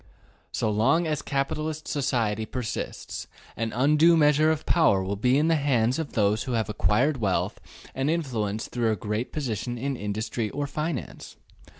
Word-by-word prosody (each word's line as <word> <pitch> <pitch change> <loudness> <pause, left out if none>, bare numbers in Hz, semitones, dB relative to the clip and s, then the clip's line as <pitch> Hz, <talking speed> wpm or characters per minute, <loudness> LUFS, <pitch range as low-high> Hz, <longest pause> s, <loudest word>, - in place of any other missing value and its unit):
So 110 - 0
long 115 +11 +3
as 150 -3 -1
capitalist 155 +3 -2
society 115 -7 0
persists, 125 -4 -5 0.3
an 115 0 -2
undue 150 +6 +4
measure 150 0 +4
of 160 -1 -1
power 100 - +3
will 95 +2 -2
be 125 +6 +2
in 150 +2 +3
the 165 - +4
hands 130 -2 +1
of 160 -4 -4
those 105 0 +2
who 130 - -3
have 110 -2 0
acquired 125 +7 +2
wealth 95 -3 0 0.3
and 135 +2 -1
influence 115 -10 -1
through 120 -2 0
a - - +1
great 105 +4 -3
position 120 -4 -3
in 135 +3 -2
industry 110 +1 -3
or 145 +5 -3
finance. 150 -1 -5
125 Hz, 165 wpm, -26 LUFS, 110-150 Hz, 0.3 s, undue